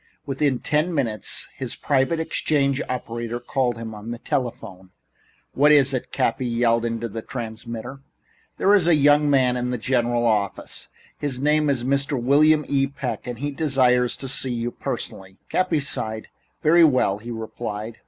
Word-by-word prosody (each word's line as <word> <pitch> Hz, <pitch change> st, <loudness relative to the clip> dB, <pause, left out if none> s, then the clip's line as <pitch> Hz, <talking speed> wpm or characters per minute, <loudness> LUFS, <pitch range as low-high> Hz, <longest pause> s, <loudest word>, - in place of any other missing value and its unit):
Within 135 Hz, -1 st, 0 dB
ten 155 Hz, +6 st, 0 dB
minutes 115 Hz, -8 st, -2 dB
his -, -, -6 dB
private 140 Hz, +3 st, +1 dB
exchange 140 Hz, -4 st, 0 dB
operator 120 Hz, -1 st, -4 dB
called 120 Hz, -1 st, -1 dB
him 115 Hz, -1 st, -6 dB
to 105 Hz, +1 st, -9 dB
the 120 Hz, -, -4 dB
telephone. 115 Hz, -7 st, -4 dB, 0.6 s
"What 145 Hz, +2 st, +4 dB
is 140 Hz, -2 st, +5 dB
it?" 130 Hz, -, -3 dB
Cappy 125 Hz, +2 st, 0 dB
yelled 115 Hz, 0 st, +1 dB
into 115 Hz, 0 st, -2 dB
the 115 Hz, +1 st, -6 dB
transmitter. 115 Hz, +2 st, -7 dB, 0.6 s
"There 200 Hz, -, +4 dB
is 190 Hz, -5 st, +4 dB
a 170 Hz, -, +6 dB
young 145 Hz, 0 st, +4 dB
man 130 Hz, -3 st, +3 dB
in 125 Hz, 0 st, -2 dB
the 125 Hz, -, -1 dB
general 120 Hz, 0 st, 0 dB
office. 105 Hz, -4 st, -1 dB, 0.3 s
His 135 Hz, -4 st, -2 dB
name 150 Hz, +1 st, +2 dB
is 130 Hz, -4 st, 0 dB
Mr. 140 Hz, +1 st, 0 dB
William 150 Hz, +4 st, +4 dB
E. 135 Hz, -1 st, +1 dB
Peck 125 Hz, -4 st, -5 dB
and 120 Hz, -1 st, -4 dB
he 145 Hz, +4 st, -3 dB
desires 130 Hz, -5 st, +2 dB
to 135 Hz, -, -5 dB
see 130 Hz, -1 st, 0 dB
you 120 Hz, +1 st, -2 dB
personally." 95 Hz, -4 st, -5 dB
Cappy 180 Hz, -4 st, +1 dB
sighed. 110 Hz, -6 st, -2 dB, 0.3 s
"Very 170 Hz, +2 st, +6 dB
well," 130 Hz, -9 st, +3 dB
he 115 Hz, +3 st, -9 dB
replied. 110 Hz, -1 st, -6 dB
125 Hz, 165 wpm, -23 LUFS, 115-145 Hz, 0.6 s, a